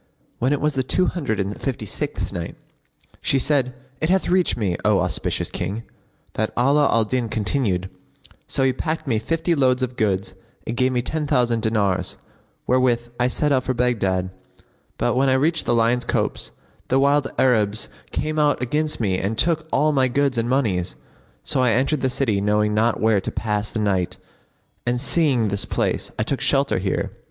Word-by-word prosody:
When 130 +3 +1
it 145 - +1
was 150 0 0
the 135 - 0
Two 180 +8 +1
Hundred 140 - -2
and 100 +1 -3
Fifty 125 -5 -3
sixth - - -4
Night, 85 -1 -5 0.7
She 140 - +2
said, 130 -2 +1 0.2
It 155 - 0
hath 190 +1 +2
reached 180 -5 +2
me, 100 -6 0
O 105 -2 +4
auspicious 90 -3 -1
King, 100 +6 -4 0.5
that 110 0 -1
Ala 140 +4 +4
al 115 -1 +3
Din 120 +1 -1
continued, 105 -5 0 0.6
"So 135 - 0
he 130 -1 +3
packed 155 +5 -3
me 115 -6 +1
fifty 165 +8 0
loads 130 -4 +2
of 125 0 -3
goods 100 -4 -1 0.3
and 115 - -3
gave 130 +1 +2
me 125 -1 0
ten 155 +2 -2
thousand 120 -5 +2
dinars, 105 -4 0 0.5
wherewith 120 -2 +2
I 125 - +3
set 145 +3 0
out 130 -2 +2
for 130 - -1
Baghdad; 95 -7 0 0.7
but 120 - 0
when 135 +1 +3
I - - +4
reached 155 +5 +1
the 120 - +3
Lion's 115 +2 +2
Copse, - - -1 0.4
the 130 - +2
wild 140 0 +2
Arabs 110 -4 +2 0.2
came 155 +1 -2
out 150 -1 +3
against 150 +5 -1
me 95 -5 0
and 105 +3 -2
took 160 0 +1
all 150 +3 +3
my 135 -3 +3
goods 140 +1 +1
and 115 0 -1
monies. 105 -10 0 0.5
So - - 0
I 125 -3 +3
entered 135 +4 +1
the 130 - +1
city 115 -6 0
knowing 105 +1 +2
not 110 +2 +2
where 110 -2 +3
to - - -4
pass 105 -1 -2
the - - -5
night 95 -4 0 0.7
and, 120 0 0
seeing 135 -5 +2
this 100 0 0
place, - - -1
I - - +1
took - - -2
shelter - - +2
here." - - -2
125 Hz, 185 wpm, -22 LUFS, 105-140 Hz, 0.7 s, O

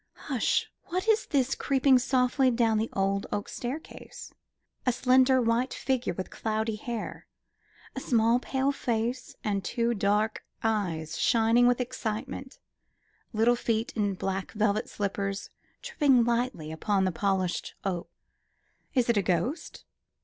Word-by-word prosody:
Hush! 260 -6 0 0.2
what 370 +4 -3
is 445 0 +3
this 270 -3 +1
creeping 270 -1 +3
softly 255 +1 +2
down 230 -3 +2
the 225 - -1
old 195 0 0
oak 205 - -2
staircase? 270 +6 -7 0.5
A 250 - +3
slender 255 +1 +4
white 235 +2 +1
figure 255 -8 -1
with 185 - -5
cloudy 220 0 -2
hair; 235 0 -5 0.7
a - - -2
small 235 -1 +3
pale 265 +2 0
face, 240 -1 -2
and 200 -2 -1
two 235 +3 0
dark 210 +1 0 0.2
eyes 175 -8 -1
shining 230 +1 +4
with 245 0 +3
excitement; 255 +2 -4 0.7
little 225 +2 +3
feet 230 -1 -1
in 205 -3 0
black 190 +1 -3
velvet 210 -1 0
slippers 200 -1 -3 0.3
tripping 290 - +3
lightly 235 -9 -1
upon 190 +4 0
the 185 - +1
polished 185 0 -1
oak. 180 -3 -2 0.9
Is 250 -2 +3
it 235 -2 +2
a - - +4
ghost? 185 - -2
230 Hz, 135 wpm, -28 LUFS, 205-255 Hz, 0.9 s, slender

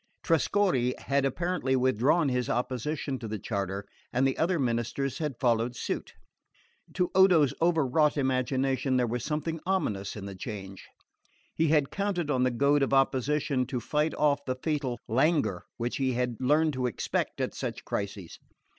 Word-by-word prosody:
Trescorre 165 -6 +2
had 140 0 0
apparently 165 -1 0
withdrawn 130 +6 +3
his 125 -1 -1
opposition 130 +2 -2
to 115 - -6
the 110 0 -3
charter, 100 -1 -3 0.3
and 125 +2 +2
the 135 - +1
other 175 +2 +1
ministers 120 +1 -1
had 150 -6 -3
followed 120 -1 +1
suit. - - -4 0.8
To 180 -1 0
Odo's 180 -7 +5
overwrought 155 -3 +3
imagination 130 0 +1
there 125 - +2
was 120 0 -3
something 160 +3 -2
ominous 105 - -1
in 100 -2 -7
the 100 - -6
change. 95 -1 -7 0.7
He 160 - +1
had 150 -2 +2
counted 190 -6 -1
on 130 -3 +1
the 130 - +3
goad 140 +4 +2
of 135 0 +2
opposition 135 0 +1
to 125 -1 -2
fight 150 +5 0
off 145 -1 +2
the 130 - -1
fatal 145 -6 -1
languor 145 +7 +1
which 120 +1 -2
he 130 -2 0
had 125 -1 -1
learned 150 +4 +3
to 130 -1 -1
expect 120 - -2
at - - -1
such - - -5
crises. 100 -3 -5
135 Hz, 160 wpm, -28 LUFS, 120-150 Hz, 0.8 s, Odo's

